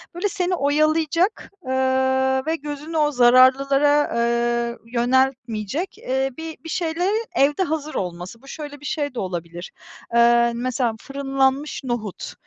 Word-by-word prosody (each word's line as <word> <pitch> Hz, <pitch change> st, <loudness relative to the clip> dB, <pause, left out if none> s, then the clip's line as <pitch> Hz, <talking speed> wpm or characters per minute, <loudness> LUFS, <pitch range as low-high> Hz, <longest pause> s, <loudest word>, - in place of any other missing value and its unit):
böyle 390 Hz, +4 st, -1 dB
seni 370 Hz, -2 st, -1 dB
oyalayacak, 310 Hz, +6 st, +1 dB
eee, 260 Hz, -, -3 dB, 0.7 s
ve 320 Hz, +1 st, 0 dB
gözünü 300 Hz, +1 st, -6 dB
o 300 Hz, -1 st, +2 dB
zararlılara, 275 Hz, +3 st, +4 dB
eee, 235 Hz, 0 st, 0 dB, 0.2 s
yöneltmeyecek, 250 Hz, -, 0 dB
eee, 265 Hz, +1 st, -1 dB
bi 320 Hz, -1 st, -7 dB
bir 325 Hz, -, -8 dB
şeylerin 360 Hz, +7 st, -1 dB
evde 290 Hz, +6 st, +3 dB
hazır 310 Hz, -2 st, -3 dB
olması. 180 Hz, +4 st, -5 dB
Bu 275 Hz, -, -17 dB
şöyle 290 Hz, 0 st, -8 dB
bir 295 Hz, -, -13 dB
şey 290 Hz, -1 st, -2 dB
de 250 Hz, -, -5 dB
olabilir. 175 Hz, -1 st, -5 dB, 0.4 s
Eee, 235 Hz, 0 st, +5 dB
mesela 245 Hz, -1 st, -1 dB
fırınlanmış 275 Hz, +1 st, -1 dB
nohut. 240 Hz, -6 st, -4 dB
275 Hz, 130 wpm, -22 LUFS, 235-310 Hz, 0.7 s, Eee